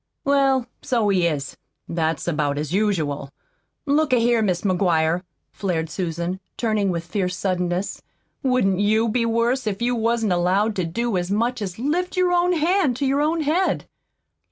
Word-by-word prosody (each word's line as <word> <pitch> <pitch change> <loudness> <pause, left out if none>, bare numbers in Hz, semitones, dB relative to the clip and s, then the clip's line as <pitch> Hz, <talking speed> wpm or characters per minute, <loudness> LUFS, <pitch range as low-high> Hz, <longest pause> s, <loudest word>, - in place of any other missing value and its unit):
"Well, 275 -2 +3 0.2
so 230 -5 +1
he 180 -3 +3
is. 140 -4 -3 0.3
That's 165 -1 -1
about 150 -3 0
as 150 +2 -3
usual. 160 -9 0 0.6
Look 290 0 +2
a - - +7
here, 235 0 +3
Mis' 185 -5 0
McGuire," 175 -3 +2 0.3
flared 165 -5 -2
Susan, 175 0 -3 0.2
turning 215 -4 +1
with 170 -2 -2
fierce 180 +1 -2
suddenness, 180 0 -2 0.4
"wouldn't 250 -8 +2
YOU 220 +3 +2
be 230 +1 +1
worse 230 +2 +1
if 200 -1 -2
you 240 +1 +1
wasn't 230 -3 +1
allowed 190 +5 +1
to 185 - 0
do 225 +5 -1
as 175 0 -2
much 235 +4 0
as 185 -3 -4
lift 345 - -1
your 365 -1 +3
own 355 0 +3
hand 335 -4 +2
to 275 - -1
your 275 +2 +2
own 320 +2 +1
head?" 325 +6 +1
210 Hz, 165 wpm, -22 LUFS, 175-255 Hz, 0.6 s, a